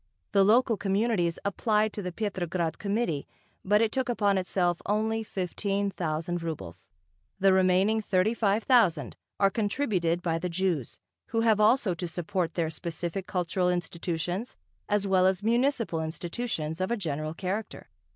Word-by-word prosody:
The 200 -1 +5
local 225 +2 +4
communities 195 -3 +1
applied 210 +1 +1
to 210 - -4
the 180 -2 -4
Petrograd 175 -4 -2
Committee, 200 -8 -1 0.4
but 210 +3 +4
it 220 - +1
took 260 -1 -1
upon 205 -5 +2
itself 180 -2 0
only 220 +2 +1
fifteen 200 +1 -2
thousand 170 0 -2
rubles. 120 - -6 0.5
The 195 0 +5
remaining 190 +4 +3
thirty 195 +1 +1
five 215 -1 +1
thousand 200 - +3 0.2
are 195 -1 +4
contributed 200 -7 0
by 165 -1 0
the 180 +2 -3
Jews, 170 -7 -1 0.3
who 225 0 0
have 220 -2 +3
also 215 -2 +4
to 175 +1 -4
support 175 0 -2
their 165 -2 0
specific 170 +3 -4
cultural 180 0 0
institutions 175 +4 -3 0.3
as 205 -1 +1
well 185 -1 +4
as 190 +1 0
municipal 235 - +1
institutions 165 0 -3
of 185 - 0
a 235 - 0
general 155 -4 -3
character. 195 - -4
190 Hz, 150 wpm, -28 LUFS, 170-215 Hz, 0.5 s, The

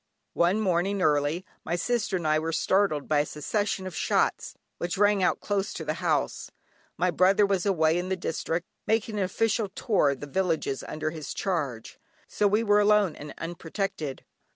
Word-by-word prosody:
One 180 +5 +2
morning 195 0 +1
early, 150 +1 +1 0.2
my 170 - -1
sister 210 +1 0
and 170 - -5
I 155 0 +3
were 160 +1 -2
startled 165 -3 +1
by 150 -1 +3
a 145 - +2
succession 195 +5 -2
of 185 -3 -6
shots - - 0 0.2
which 175 +2 -2
rang 205 0 +4
out 180 - +1
close 200 -1 -1
to - - -5
the - - 0
house. - - 0 0.5
My 180 0 +2
brother 190 +4 +4
was 195 -1 0
away 165 -3 +3
in 180 +1 -4
the 190 - +1
district, 170 -1 -3 0.2
making 220 -1 0
an - - +2
official 215 +2 0
tour 195 -5 +1
among 140 -2 -3
the - - -4
villages 160 -3 -1
under 155 0 -3
his 155 -2 -6
charge, 145 - -3 0.3
so 205 - +1
we 210 +3 +2
were 205 -1 +4
alone 210 -4 +3
and 150 - -9
unprotected. 165 -3 -4
180 Hz, 180 wpm, -27 LUFS, 155-200 Hz, 0.5 s, rang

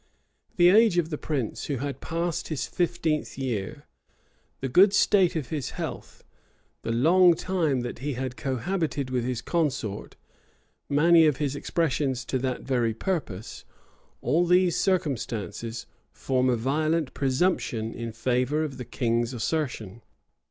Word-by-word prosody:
The 175 0 +6
age 215 -1 +5
of 170 -1 +1
the 150 - -2
prince, 135 -8 -3
who 140 - -2
had 140 +1 -4
passed 170 0 -2
his 155 -4 -2
fifteenth 170 -3 -1
year, 135 +3 -4 0.7
the 135 - -2
good 190 +10 +5
state 195 -3 +4
of 150 -7 -3
his 150 -4 -4
health, - - -6 0.6
the 115 - -3
long 170 +9 +5
time 160 -8 0
that 120 -1 -5
he 145 +3 -3
had 130 0 -4
cohabited 140 +1 -2
with 125 -2 0
his 125 -1 -3
consort, 140 - -2 0.7
many 160 +3 +5
of 145 -4 +1
his 145 -2 -1
expressions 140 -5 -1
to 130 - -1
that 130 0 -2
very 120 -4 0
purpose; 115 - -4 0.6
all 165 +8 +2
these 180 -1 +4
circumstances 115 - -2 0.3
form 130 -1 0
a 125 - +3
violent 155 +5 0
presumption 130 -5 0
in 115 -1 -5
favor 125 +6 0
of 140 -4 -5
the 125 - -6
king's 120 0 -1
assertion. 120 - -3
140 Hz, 140 wpm, -26 LUFS, 120-165 Hz, 0.7 s, The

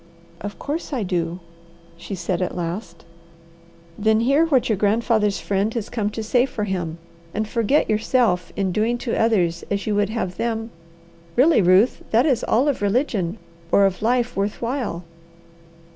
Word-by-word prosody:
"Of 205 +1 -6
course 300 +1 -4
I 245 -5 -1
do," 175 -1 -2 0.5
she 170 +4 -7
said 175 0 -2
at 180 - -2
last. 170 0 -5 0.9
"Then 220 +1 +3
hear 280 +7 +3
what 270 -6 +2
your 220 - +2
grandfather's 210 0 +1
friend 200 +2 0
has 230 -2 -3
come 215 -4 -1
to 220 +1 -5
say 245 +4 +2
for 215 -5 -4
him, 175 -5 -3 0.4
and 215 +1 -1
forget 230 +6 +1
yourself 215 -4 +1
in 195 -2 0
doing 220 +5 +1
to 240 -1 -4
others 180 -7 +1
as 200 0 -1
you 215 - 0
would 205 0 +1
have 190 -6 -3
them 225 -1 -2 0.6
really, 280 -1 +5
Ruth, 185 +6 +4
that 230 +4 +3
is 265 -7 +2
all 255 +6 +2
of 285 - 0
religion 205 - 0 0.3
or 200 - +5
of 185 -2 -1
life 245 +2 +1
worth 200 +2 -1
while. 235 -8 -3
215 Hz, 165 wpm, -22 LUFS, 190-235 Hz, 0.9 s, really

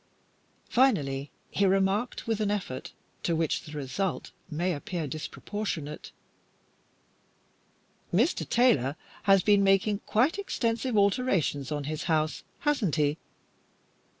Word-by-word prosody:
Finally, 145 - +2 0.2
he 200 - +1
remarked, 195 +5 +1
with 225 -2 -1
an 210 - +1
effort 190 -11 -3 0.3
to 170 - 0
which 160 -1 0
the 150 - -10
result 150 +7 -3 0.2
may 175 +3 0
appear 165 +2 -4
disproportionate 155 +2 -5 2.0
"Mr. 240 - +1
Taylor 150 - +3 0.3
has 195 -1 +6
been 205 -1 +5
making 195 +1 +3
quite 270 - +2
extensive 235 - -1
alterations 200 - +1
on 145 -1 -2
his 155 +2 -4
house, 155 -2 +1 0.2
hasn't 275 - +1
he?" 150 0 +1
190 Hz, 110 wpm, -28 LUFS, 150-215 Hz, 2.0 s, has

